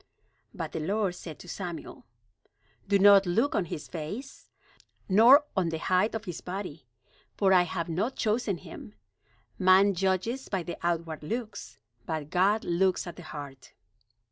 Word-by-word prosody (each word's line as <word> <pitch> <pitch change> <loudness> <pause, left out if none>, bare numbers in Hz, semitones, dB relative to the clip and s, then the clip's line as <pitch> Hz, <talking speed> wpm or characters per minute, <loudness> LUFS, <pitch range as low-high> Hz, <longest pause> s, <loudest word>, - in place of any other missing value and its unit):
But - - -6
the - - -4
Lord 195 +3 0
said 165 -3 -9
to - - -13
Samuel: 175 -1 -7 0.8
"Do 200 0 +4
not 200 -1 +7
look 230 +11 +1
on 195 - 0
his 155 -2 -7
face, 205 - -7 0.6
nor 240 +9 +7
on 185 -4 +1
the 165 - -3
height 185 +7 +1
of 220 0 -5
his 180 -4 -6
body, 180 -7 -7 0.5
for 195 -2 +4
I 180 - +6
have 175 -1 -3
not 195 +10 -2
chosen 215 -3 0
him. 110 -7 -11 0.6
Man 190 +2 +5
judges 190 +8 -1
by 190 -3 -2
the 170 - -6
outward 165 -2 -2
looks, 200 - -6 0.3
but 155 -2 -4
God 195 +4 +2
looks 180 +2 +1
at 175 - -8
the - - -10
heart." 145 -4 -10
185 Hz, 155 wpm, -28 LUFS, 165-205 Hz, 0.8 s, not